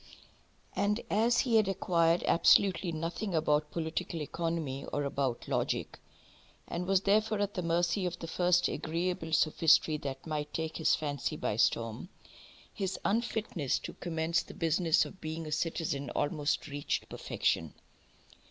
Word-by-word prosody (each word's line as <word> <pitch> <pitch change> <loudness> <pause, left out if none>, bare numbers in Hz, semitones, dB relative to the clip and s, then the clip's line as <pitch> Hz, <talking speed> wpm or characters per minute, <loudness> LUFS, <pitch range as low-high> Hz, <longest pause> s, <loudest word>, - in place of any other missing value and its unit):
And 210 +2 +1
as 230 +4 +3
he 235 -3 +3
had 215 -3 +3
acquired 170 -3 +2
absolutely 180 +1 +4
nothing 170 +4 -3
about 150 -1 +2
political 165 +1 -3
economy 155 -3 -3
or 145 - -2
about 135 -3 -2
logic, - - -1 0.7
and 180 +1 -4
was 195 -1 +3
therefore 215 +2 +2
at 205 0 -1
the 180 - -2
mercy 175 +3 +1
of 175 0 -4
the - - -7
first 180 +2 +2
agreeable 165 0 -2
sophistry 155 0 +4
that 140 -2 -6
might 150 -2 -4
take 160 0 -3
his 160 - +3
fancy 145 -4 -3
by - - -1
storm, 115 +6 0 0.6
his 195 -3 -2
unfitness 215 - 0
to - - -7
commence 165 -1 -1
the - - -12
business 165 0 +2
of 190 - -11
being 160 +1 -4
a 155 - -6
citizen 150 -3 -1
almost 150 0 0
reached 145 -1 -2
perfection. - - -1
165 Hz, 145 wpm, -31 LUFS, 155-185 Hz, 0.7 s, absolutely